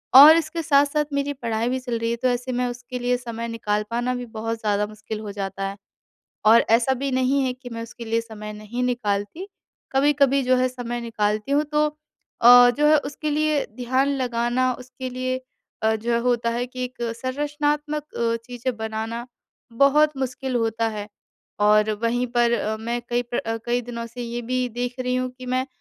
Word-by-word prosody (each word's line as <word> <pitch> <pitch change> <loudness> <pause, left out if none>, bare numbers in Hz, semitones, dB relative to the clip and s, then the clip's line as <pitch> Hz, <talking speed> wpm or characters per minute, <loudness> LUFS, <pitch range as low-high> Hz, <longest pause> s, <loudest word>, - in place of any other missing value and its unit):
और 295 +4 +11
इसके 330 +1 -2
साथ-साथ 290 0 +3
मेरी 280 0 0
पढ़ाई 230 -3 -2
भी 260 +1 -1
चल 245 -2 -3
रही 230 0 -1
है, - - 0
तो 255 - 0
ऐसे 245 +1 -1
में 250 0 0
उसके 245 +1 -5
लिए 245 0 +1
समय 235 -1 -5
निकाल 210 -2 -1
पाना 240 +2 -1
भी 245 - -5
बहुत 225 0 -4
ज़्यादा 210 -1 0
मुश्किल 215 0 -7
हो 210 -1 -6
जाता 195 -1 -4
है 200 - -8 0.7
और 230 +2 +7
ऐसा 235 +3 +4
भी 275 +2 -2
नहीं 260 +2 +2
है 255 - 0
कि 250 0 -11
मैं 230 0 -5
उसके 235 +1 -9
लिए 230 0 0
समय 215 -2 -8
नहीं 215 +4 -5
निकालती। 235 - -2 0.4
कभी-कभी 275 0 +3
जो 255 0 +3
है 255 0 +2
समय 240 -1 -5
निकालती 215 +1 -1
हूँ, 295 +1 +3
तो 300 0 +1 0.5
अ, 245 +1 +9
जो 295 +5 +1
है 310 - +7
उसके 300 +1 -4
लिए 300 -1 +1
ध्यान 260 +3 +1
लगाना 245 0 0
उसके 255 0 -7
लिए 255 +1 -2 0.5
अ, 220 0 +3
जो 235 +2 -2
है 235 - +3
होता 235 -1 +1
है 240 +1 -1
कि 255 0 -5
एक 250 -1 -7 0.2
संरचनात्मक 295 +2 -1
अ, 230 0 0
चीज़ें 245 0 -4
बनाना 220 +2 -4 0.5
बहुत 280 +4 +4
मुश्किल 260 -1 -2
होता 225 0 0
है 210 -1 -6 0.5
और 210 +1 +4
वहीं 245 +2 +1
पर 235 0 +4
अ, 220 -2 0
मैं 235 +2 -3
कई 240 0 +1
प्र 225 -1 -1
कई 240 +1 +1
दिनों 235 -1 -6
से 245 +2 -8
ये 235 0 -4
भी 250 +1 -1
देख 245 +1 -3
रही 250 0 -1
हूँ 255 0 -1
कि 255 - -9
मैं 255 +1 0
245 Hz, 195 wpm, -23 LUFS, 230-260 Hz, 0.7 s, और